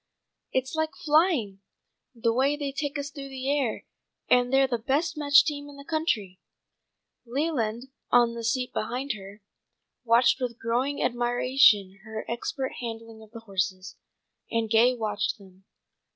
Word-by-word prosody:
"It's 260 0 -1
like 315 0 -1
flying, 295 - +2 0.5
the 230 0 +1
way 275 +4 +2
they 285 -2 -3
take 285 +1 -3
us 285 0 -4
through 280 -2 -8
the 270 +1 -1
air, 265 -6 -2 0.4
and 245 0 +3
they're 270 0 +5
the 245 -3 -2
best 295 +8 0
matched 285 -2 +5
team 290 -2 -4
in 285 - -13
the 280 - -11
country." 220 - -1 0.8
Leland, 250 -3 -2 0.2
on 240 -1 +4
the 235 0 -6
seat 250 +2 -1
beside 250 +5 -2
her, 200 0 -11 0.6
watched 235 +2 +4
with 240 -2 -3
growing 245 +5 -1
admiration 240 -5 +3
her 220 0 -6
expert 260 +3 -3
handling 225 -1 -7
of 220 - -15
the 230 +1 -10
horses, 190 -3 -3 0.5
and 230 -1 -1
Gay 240 +3 +5
watched 215 -3 -2
him. 190 -2 -18
245 Hz, 150 wpm, -27 LUFS, 220-280 Hz, 0.8 s, they're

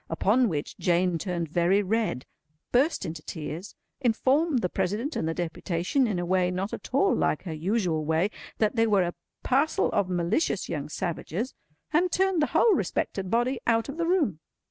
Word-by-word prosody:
Upon 220 +9 +2
which 145 -4 -4
Jane 175 -1 +2
turned 175 -3 -2
very 175 +5 +2
red, 200 - -1 0.5
burst 270 - +2
into 160 -2 -5
tears, 160 +4 -6 0.2
informed 265 +3 +2
the - - +3
President 220 - -2
and 160 - -1
the 165 - -2
deputation, 175 - 0
in 205 -5 -1
a 175 - -2
way 180 0 +2
not 185 +3 -3
at - - -7
all 330 +10 +3
like 150 - 0
her 170 -4 -5
usual 170 -1 0
way, 160 +6 +1 0.3
that 215 +1 +1
they 225 -1 +3
were 200 -3 +4
a 175 0 -2 0.3
parcel 280 +5 +2
of 200 -3 +1
malicious 180 - 0
young 145 -1 -4
savages, 175 - -3 0.4
and 350 +3 +3
turned 380 -2 +2
the 300 - +3
whole 455 - +5
respected 190 - -1
body 240 +4 +1
out 230 +2 +2
of 280 - -6
the 335 -1 0
room. 305 - +1
195 Hz, 180 wpm, -27 LUFS, 170-255 Hz, 0.5 s, whole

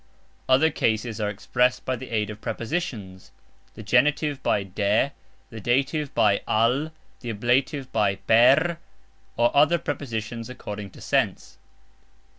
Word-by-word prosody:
Other 145 +5 +4
cases 110 -4 -1
are 105 - 0
expressed 125 +5 0
by 130 - -1
the 130 +1 -9
aid 110 -2 -1
of 105 +1 -11
prepositions 110 - -5 0.4
(the 110 - -9
genitive 140 +5 +2
by 100 - +1
"de", 100 +7 0 0.4
the 115 - -8
dative 135 +6 0
by 100 -2 +3
"al", 125 +8 +1 0.3
the 120 - -7
ablative 125 +5 0
by 105 -3 +1
"per", 130 - +4 0.6
or 120 0 +2
other 150 +4 +5
prepositions 115 -6 -5
according 105 -5 -7
to - - -15
sense). - - -1
120 Hz, 130 wpm, -24 LUFS, 105-140 Hz, 0.6 s, other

